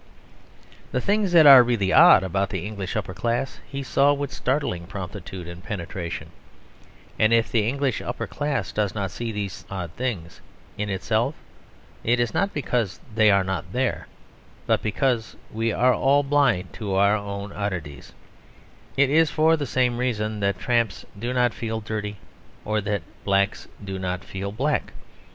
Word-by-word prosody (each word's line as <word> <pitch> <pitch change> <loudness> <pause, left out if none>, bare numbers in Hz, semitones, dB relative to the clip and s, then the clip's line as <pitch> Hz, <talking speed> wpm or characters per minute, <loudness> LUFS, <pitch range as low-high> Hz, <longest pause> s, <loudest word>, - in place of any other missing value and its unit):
The 125 - 0
things 200 +5 +1
that 165 -3 +8
are 135 -3 +11
really 115 -6 +1
odd 95 - +8
about 95 +2 -1
the 95 -2 -4
English 100 -3 -5
upper 100 -3 -3
class 120 +5 -2
he 140 0 -5
saw 140 +2 +3
with 145 -1 -3
startling 125 - -1
promptitude 95 -2 -7
and 85 0 -9
penetration, 85 -4 -5 0.9
and 110 +1 +4
if 115 -1 +3
the 110 -3 +2
English 135 -1 -1
upper - - -4
class 145 -2 -2
does 105 -2 -1
not 100 -3 -2
see 120 -1 -4
these 100 -3 -5
odd 90 -4 -5
things 90 -7 -4 0.3
in 105 0 -3
itself, 110 +8 0 0.7
it 120 +1 +2
is 120 -2 0
not 200 0 +1
because 120 -8 -2
they 110 -1 +5
are 100 -1 +4
not 95 -4 -4
there, - - -1 0.6
but - - +2
because 115 +1 -1 0.2
we 115 +1 -1
are 125 +3 +3
all 140 +3 +3
blind 135 -10 +1
to 100 -4 -3
our 100 +2 +4
own 100 -1 -5
oddities; 90 -8 -5 0.9
it 140 0 +4
is 160 +1 +4
for 160 +2 +3
the 145 -3 -3
same 125 -2 +1
reason 110 -4 -1
that 100 -2 0
tramps 115 -1 0
do 120 +3 -2
not 125 -2 +2
feel 110 -1 -3
dirty, 105 -1 -4 0.5
or 110 0 0
that 100 -3 -2 0.2
niggers 100 +1 +1 0.2
do 95 -1 -5
not 90 0 -3
feel 100 0 -5
black. 140 +8 -1
110 Hz, 165 wpm, -24 LUFS, 100-125 Hz, 0.9 s, are